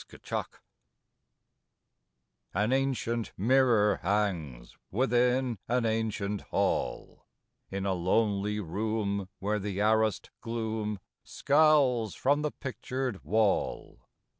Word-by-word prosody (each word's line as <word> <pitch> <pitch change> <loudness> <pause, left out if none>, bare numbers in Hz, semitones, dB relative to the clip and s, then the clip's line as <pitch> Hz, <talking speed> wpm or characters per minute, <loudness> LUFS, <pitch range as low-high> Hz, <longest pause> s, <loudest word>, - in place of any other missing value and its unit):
THE - - -14
MIRROR - - -1 2.1
An 105 +6 +2
ancient 125 -4 -1
mirror 115 -1 +4
hangs 85 -12 -2
Within 125 0 +1
an 125 0 +1
ancient 110 -3 -1
Hall; - - -2 0.4
In 95 0 -3
a 95 - +1
lonely 100 +3 +1
room 100 +1 -2
where 105 +2 -1
th' 100 -1 -4
arrased 110 +1 +1
gloom 110 -2 -3 0.3
Scowls 140 -7 +3
from 145 +3 +2
the 150 - 0
pictured 130 -5 -4
wall. 105 +5 0
110 Hz, 95 wpm, -29 LUFS, 100-125 Hz, 2.1 s, mirror